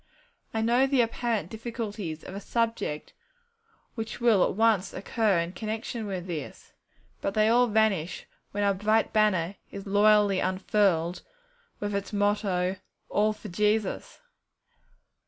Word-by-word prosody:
I 220 - -1
know 240 +4 +3
the 270 -2 +3
apparent 230 -5 -1
difficulties 215 -7 -5
of - - -9
a 200 - -5
subject 225 -10 -2 0.8
which 225 0 -5
will 230 -6 +4
at - - 0
once 215 -3 +2
occur 205 0 +1
in 170 +1 -1
connection 220 +2 -4
with 185 -3 -4
this, 165 -6 -7 0.5
but 195 - -2
they 215 0 +4
all 245 +2 +5
vanish 210 -6 +1 0.3
when 205 0 -1
our 200 0 +3
bright 215 +3 +1
banner 200 -4 +2
is 200 -1 -8
loyally 205 -1 +4
unfurled, 185 -2 +1 0.6
with 205 0 -3
its 200 0 -3
motto, 200 -3 0 0.3
'All 210 +1 +2
for 215 0 -9
Jesus!' 210 +2 0
210 Hz, 135 wpm, -27 LUFS, 190-220 Hz, 0.8 s, all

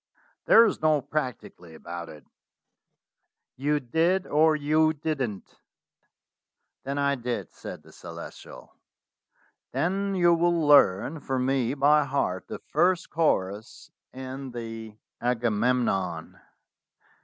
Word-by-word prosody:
"There 230 - +7
is 210 - -1
no 155 -1 +3
'practically' 125 - -5
about 85 +1 -8
it. 75 - -13 1.3
You 145 +3 0
did 165 +8 +1
or 155 +1 +3
you 155 +1 +2
didn't." 140 -9 -4 1.2
"Then 140 +1 -4
I 140 0 +2
did," 120 -7 -4
said - - -9
the - - -17
Celestial. - - -11 1.0
"Then 195 +2 -1
you 175 -2 +4
will 170 0 +2
learn 145 - +4
for 135 -2 -3
me 130 0 0
by 150 +2 +4
heart 130 -10 -2
the - - -6
first 180 -1 0
chorus 105 - -1 0.2
in 130 +1 -7
the 115 -2 -7 0.2
'Agamemnon.' 115 -7 0
135 Hz, 110 wpm, -26 LUFS, 115-155 Hz, 1.3 s, There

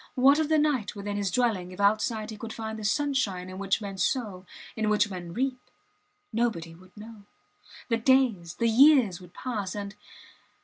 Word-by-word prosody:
What 275 +4 +5
of 310 -1 0
the 315 - +4
night 290 -10 0
within 205 0 -4
his 200 -1 -1
dwelling 190 -4 0
if 185 - -11
outside 215 +2 +1
he 215 - -8
could 225 +1 -7
find 220 -1 -5
the - - -7
sunshine 215 -7 0
in 185 +1 -8
which 195 +2 0
men 195 -1 -6
sow, 195 -3 -1 0.3
in 220 -1 0
which 210 0 +2
men 175 -2 -6
reap! 255 +4 -2 0.7
Nobody 215 -8 -1
would 185 +4 -19
know. 215 -1 -11 0.6
The 230 - +1
days, 230 -9 +2
the 235 - +1
years 235 - +5
would 180 -1 -15
pass, 210 -7 -4
and 200 -1 -5
215 Hz, 180 wpm, -27 LUFS, 190-245 Hz, 0.7 s, What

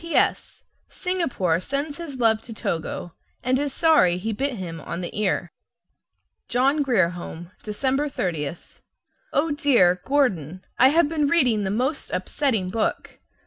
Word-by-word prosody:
P.S. 335 0 0 0.3
Singapore 260 - -1
sends 285 - -3
his 325 -5 -6
love 225 -3 +3
to 230 - -9
Togo, 170 -2 -4 0.3
and 255 +1 +2
is 290 -1 -1
sorry 300 - +4
he 220 +5 -3
bit 275 +6 -1
him 170 -7 -6
on 170 +5 -5
the 175 - -6
ear. 190 -4 0 1.0
JOHN 270 +5 +2
GRIER 225 -11 +3
HOME, 175 0 -8
December 265 +7 -1
30. 165 - -2 0.8
O 305 +2 +1
DEAR, 235 -12 +3
Gordon, 185 - 0
I 255 - +8
have 310 +3 +4
been 300 -2 0
reading 255 -9 +4
the - - -1
most 255 +9 -1
upsetting 225 -11 -1
book! 220 +1 -2
240 Hz, 145 wpm, -24 LUFS, 180-285 Hz, 1.0 s, I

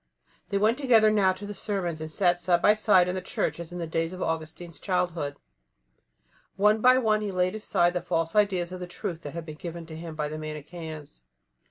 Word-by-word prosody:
They 200 - 0
went 220 +5 +2
together 225 -6 +5
now 200 -3 +4
to 190 +2 -9
the 205 - -5
sermons 185 -6 -3
and 155 - -5
sat 175 +2 +2
side 175 0 +3
by 210 - +5
side 205 -4 +4
in 180 - -1
the 185 - -3
Church - - -2
as 170 -1 -7
in 175 - -6
the 170 - -3
days 165 +1 -2
of 185 - -7
Augustine's 160 0 -4
childhood. 175 -6 -1 1.2
One 210 +2 +3
by 255 +2 +6
one 215 -4 +2
he 210 - -2
laid 185 0 0
aside 175 -5 +1
the 180 - -1
false 165 +2 -1
ideas 190 -4 +2
of 185 - -6
the 180 - -6
truth 170 -1 -5
that 145 0 -8
had 170 -1 -5
been 155 -2 -8
given 170 0 -7
to 160 -1 -9
him 165 0 -7
by 150 -1 -2
the 155 +1 -6
Manicheans. 155 - -8
175 Hz, 220 wpm, -27 LUFS, 160-200 Hz, 1.2 s, by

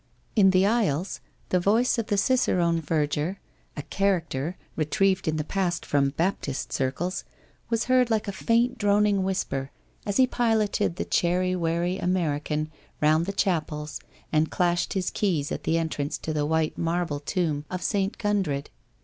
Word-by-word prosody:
In 200 -4 +6
the 185 0 +4
aisles 200 -6 0 0.3
the 180 - +3
voice 225 +7 +2
of 225 - -2
the 205 - +1
cicerone 180 -8 +2
verger, 155 +4 -1 0.4
a 145 - -4
' - - -31
character,' 170 -5 0 0.2
retrieved 185 +5 +1
in 155 - +1
the 150 - -1
past 180 0 -1
from 140 -1 +2
Baptist 150 -3 -2
circles, 150 +8 -1 0.5
was 230 -1 +1
heard 255 -1 +3
like 220 -2 0
a - - -1
faint 235 +5 +1
droning 205 -1 +3
whisper 140 -8 -2 0.4
as 205 - 0
he 260 - +6
piloted 225 -7 +1
the - - -3
chary, 180 +1 +1
wary 170 +2 0
American 155 -3 -1 0.3
round 155 +3 +3
the - - 0
chapels 155 -6 -1 0.3
and 155 +1 +2
clashed 175 -1 +1
his 190 -2 -1
keys 165 -8 0
at - - -4
the 165 - +2
entrance 155 -3 -2
to 155 - -4
the 150 -1 0
white 160 0 0
marble 165 -3 -1
tomb 155 -2 -1
of 185 -1 -4
St. 195 -1 0
Gundred. 190 -10 -1
175 Hz, 160 wpm, -26 LUFS, 155-200 Hz, 0.5 s, In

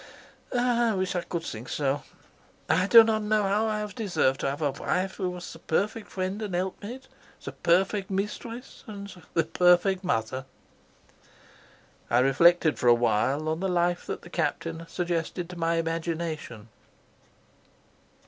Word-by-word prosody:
"I 240 -2 +2
wish 185 -1 -1
I 180 - 0
could 170 -1 -4
think 115 -4 -7
so. 140 -1 0 0.7
I 185 +4 +2
do 230 +2 +10
not 220 -1 +1
know 210 0 +1
how 205 +3 +1
I 215 -1 0
have 210 -2 -5
deserved 180 -11 0
to - - 0
have 145 +3 -4
a 145 - +2
wife 185 +7 -2
who 185 -3 -1
was 180 -1 -7
the 165 - -12
perfect 205 +7 -1
friend 190 +3 -3
and 205 -4 -3
helpmate, 205 +8 -4 0.4
the - - -5
perfect 190 +3 +1
mistress 210 +5 -5
and 200 -2 -8 0.2
the 165 - +4
perfect 180 +3 +3
mother." 130 -4 -1 1.6
I 120 - +3
reflected 155 +5 +4
for 125 - 0
a 120 - +8
while 120 +6 +1
on 160 +1 -1
the 190 +1 -1
life 175 0 0
that - - -5
the 175 - -13
Captain 165 -1 -2
suggested 175 0 -2
to - - -8
my 165 0 0
imagination. 165 -8 -3
175 Hz, 155 wpm, -27 LUFS, 160-200 Hz, 1.6 s, do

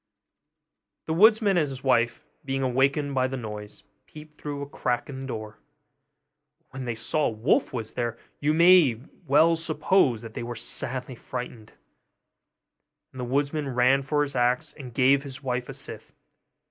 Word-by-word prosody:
The 160 - -1
woodman 210 +1 +5
and 155 -4 +2
his 135 0 -8
wife, 120 +1 +1 0.2
being 135 -1 -2
awakened 135 +3 +1
by 130 -1 +2
the 135 0 -4
noise, 105 -3 -8 0.2
peeped 150 0 -13
through 145 -1 -4
a - - -7
crack 125 -3 -2
in 130 -1 -7
the 135 - -6
door; 110 -4 -6 1.0
but - - -45
when 135 -1 -6
they 120 -2 -2
saw 145 +7 0
a - - +1
wolf 110 0 +1
was 115 -4 -5
there, 120 -1 -2 0.2
you 145 +1 +1
may 170 -6 +6 0.3
well 155 +4 +5
suppose 155 - +1
that 115 -1 -9
they - - -5
were 120 0 -5
sadly 130 +2 -4
frightened; 120 -2 -7 1.4
and 130 - -10
the - - -3
woodman 140 +1 -1
ran 125 +2 +4
for 145 +2 +1
his 140 -1 -5
axe, 125 0 +1
and 130 -4 -10
gave 135 +2 +4
his 135 0 -9
wife 125 -1 -2
a - - -5
scythe. - - -7
135 Hz, 170 wpm, -26 LUFS, 120-150 Hz, 1.4 s, may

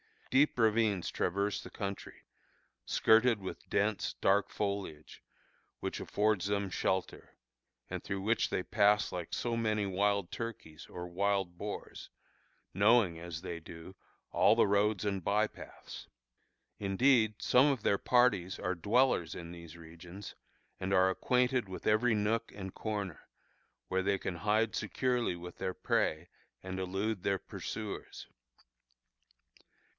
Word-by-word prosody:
Deep 140 +2 +4
ravines 110 -4 +2
traverse 100 +3 -1
the - - -10
country, 100 -2 -6 0.6
skirted 115 0 +4
with 95 - -8
dense, 105 +1 0
dark 100 +1 +2
foliage, 100 -7 -4 0.6
which - - -3
affords 105 -3 0
them 100 -1 -1
shelter, 95 0 -2 0.5
and - - -4
through 95 -1 -4
which 110 +4 +1
they 90 - -1
pass 105 +2 +3
like 90 -2 -5
so 120 -1 -1
many 110 -2 0
wild 100 -1 0
turkeys 100 -9 -7
or 90 0 -7
wild 95 0 -1
boars, 105 +2 -6 0.6
knowing, 100 -3 +4
as 85 -1 -6
they 85 -3 -5
do, 85 +2 -11 0.4
all 105 - +5
the 115 - +5
roads 100 0 +2
and 100 -3 -2
by 105 +4 +2
paths. - - -11 0.7
Indeed, 110 +2 +3
some 125 +2 +5
of 135 -7 0
their 100 - +3
parties 105 -8 +2
are 90 -2 -1
dwellers 105 -1 +2
in 85 -1 -7
these 85 -1 -10
regions, 85 +4 -10 0.5
and 95 +1 -2
are 95 0 +5
acquainted 125 +3 +1
with 95 - -8
every 110 +2 +3
nook 110 +2 0
and 95 -2 -7
corner, 100 -6 -4 0.6
where 95 0 +1
they 100 +1 +1
can 90 -2 -4
hide 105 +4 +1
securely 120 -1 0
with 90 0 -9
their 95 -1 -2
prey 80 0 0 0.3
and 95 0 -5
elude 95 +2 -2
their 100 +1 +1
pursuers. - - -7
100 Hz, 135 wpm, -32 LUFS, 90-110 Hz, 0.7 s, all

